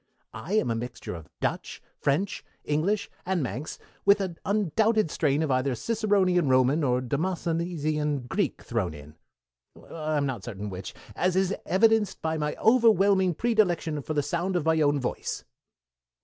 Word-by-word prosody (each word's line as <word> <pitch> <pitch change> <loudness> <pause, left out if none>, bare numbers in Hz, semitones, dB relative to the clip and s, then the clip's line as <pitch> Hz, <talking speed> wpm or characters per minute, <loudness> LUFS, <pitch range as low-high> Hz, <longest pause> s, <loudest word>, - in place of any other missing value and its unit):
I 185 - -6
am 215 - +2
a - - 0
mixture 120 +2 -6
of 80 -3 -9
Dutch, - - -2 0.2
French, 165 +8 -1 0.2
English, 195 +8 0 0.2
and 180 -4 0
Manx, 125 +6 -5 0.3
with 200 +1 +5
an 185 -4 -3
undoubted 210 -1 +2
strain 150 0 +1
of 150 - -1
either 130 0 +1
Ciceronian 195 - +1
Roman 130 +4 +3
or 125 -2 +2
Demosthenesian 155 -1 -1
Greek 195 +5 -1
thrown 100 -9 -2
in 75 +1 -12 0.8
I'm 155 -2 -1
not 125 -8 -3
certain 105 -3 -6
which 95 0 -7 0.2
as 180 0 +1
is 190 0 +2
evidenced 215 +1 +3
by 160 0 -1
my 150 0 -1
overwhelming 200 -6 +4
predilection 175 -10 +1
for 155 +3 -4
the 145 - +2
sound 175 +6 -2
of 170 -4 0
my 160 -1 +3
own 145 -1 +3
voice." 125 - -4
160 Hz, 150 wpm, -27 LUFS, 140-190 Hz, 0.8 s, with